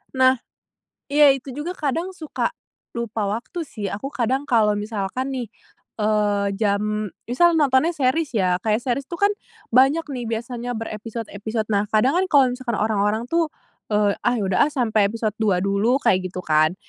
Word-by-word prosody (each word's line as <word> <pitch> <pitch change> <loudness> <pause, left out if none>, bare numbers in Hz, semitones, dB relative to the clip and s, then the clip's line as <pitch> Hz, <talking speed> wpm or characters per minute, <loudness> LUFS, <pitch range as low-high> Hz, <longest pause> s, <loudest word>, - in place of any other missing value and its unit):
Nah, 260 0 +5 0.7
iya. 290 0 +6
Itu 270 -1 -4
juga 310 +5 -4
kadang 330 +5 -2
suka 345 +7 -3 0.4
lupa 230 -3 -2
waktu, 235 - -3
sih. 210 -8 -6
Aku 270 +8 -5
kadang, 260 +3 0
kalo 220 -6 +3
misalkan 210 +5 -3
nih, 250 -3 -3 0.5
eee, 210 -2 +1
jam 210 0 0 0.2
misal 340 +7 +4
nontonnya 295 +2 +3
series, 275 0 0
ya. 185 -3 +2
Kayak 215 +3 0
series 265 +2 -2
tuh 340 - -7
kan, 405 - +5 0.4
banyak 270 +7 +4
nih, 245 -2 -4
biasanya 240 +2 -4
berepisod-episod. 220 0 -4
Nah, 205 +1 +1
kadang 255 +10 +3
kan, 380 - +2
kalo 280 -2 +6
misalkan 250 -2 -3
orang-orang 215 +1 +1
tuh, 335 -1 +2 0.5
eee, 205 -1 +3
"Ah, 245 0 +3
ya 205 - -1
udah 190 - 0
ah, - - -6
sampe 230 -5 +1
episod 220 +1 -1
2 200 -4 +3
dulu," 200 +6 +2
kayak 185 0 +2
gitu, 180 0 -7
kan? 155 +2 +3
230 Hz, 165 wpm, -22 LUFS, 210-270 Hz, 0.7 s, iya